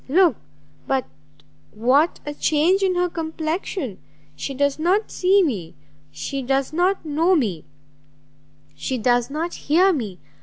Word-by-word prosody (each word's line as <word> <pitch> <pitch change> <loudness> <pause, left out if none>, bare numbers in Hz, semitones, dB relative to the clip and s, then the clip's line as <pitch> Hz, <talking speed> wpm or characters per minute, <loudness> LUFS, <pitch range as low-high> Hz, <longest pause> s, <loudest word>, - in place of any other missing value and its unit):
look 340 -2 +4 0.5
but 265 -1 0 0.6
what 255 - +2
a 295 - -4
change 320 +6 +2
in 375 -2 +2
her 360 0 +2
complexion! 320 - -4 0.4
She 270 - -5
does 285 +2 +1
not 370 +7 +1
see 385 +2 +3
me, 200 - -3 0.3
she 145 - -4
does 270 +2 0
not 360 +2 +1
know 325 +5 +2
me, 205 - -1 1.1
she 145 - -3
does 245 +1 +2
not 320 +4 -3
hear 365 +6 +3
me! 215 - -4
295 Hz, 130 wpm, -22 LUFS, 255-350 Hz, 1.1 s, look